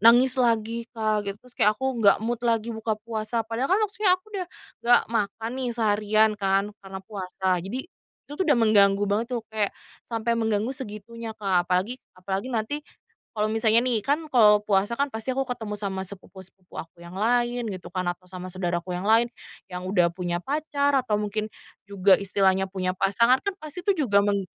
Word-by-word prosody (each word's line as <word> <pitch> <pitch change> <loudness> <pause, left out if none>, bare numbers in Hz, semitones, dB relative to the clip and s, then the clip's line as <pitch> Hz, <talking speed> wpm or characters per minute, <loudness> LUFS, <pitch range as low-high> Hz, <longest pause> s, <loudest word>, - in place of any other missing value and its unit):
nangis 245 +4 +6
lagi 230 0 +1
Kak, 215 -2 0
gitu. 200 - -4
Terus 250 - -17
kayak 210 - +5
aku 265 +2 -1
enggak 205 -3 +6
mood 235 0 -1
lagi 230 0 +1
buka 220 0 -2
puasa. 225 +1 -3
Padahal 230 +4 -2
kan - - +3
maksudnya 415 -3 +2
aku 370 - -30
udah 375 -3 -3 0.3
enggak 240 +1 +5
makan 225 +1 -1
nih 250 - -1
seharian 215 0 +3
kan 195 0 +2 0.2
karena 195 -1 -8
puasa, 190 -2 -3
jadi 195 +9 -5 0.5
itu - - -11
tuh 380 - +2
udah 295 - +5
mengganggu 205 -3 +4
banget 215 +3 +1
tuh, 235 - -2
kayak 215 -2 -1 0.3
sampai 230 0 -1
mengganggu 220 +1 0
segitunya, 230 -2 -6
Kak. 190 -4 +1
Apalagi 190 +8 0 0.2
apalagi 190 +5 -3
nanti 235 +4 -2 0.5
kalau 215 -2 -1
misalnya 220 +1 +3
nih, 230 -4 +1
kan 300 +5 0
kalau 215 -7 +6
puasa 205 +3 +1
kan 280 - +2
pasti 225 -1 -4
aku 270 +1 -1
ketemu 220 -5 -4
sama 195 -2 -3
sepupu-sepupu 190 -1 -10
aku 165 +2 -8
yang 170 +1 -11
lain 240 +3 +1
gitu 185 -2 -7
kan 185 -1 -3
atau 175 +1 -9
sama 185 0 -8
saudara 175 -2 -2
aku 180 - -9
yang 180 +3 -3
lain, 230 +2 +4 0.4
yang 180 +1 -5
sudah 180 -3 +3
punya 175 0 -3
pacar 285 -1 +1
atau 250 -5 -1
mungkin 210 +1 -1 0.4
juga 195 -1 +4
istilahnya 190 -1 +2
punya 185 -1 -2
pasangan, 230 +7 +3
kan 400 +7 -3
pasti 350 +5 -7
itu 375 -7 +2
juga 200 -3 +4
meng 200 -1 +1
215 Hz, 190 wpm, -25 LUFS, 195-240 Hz, 0.5 s, nangis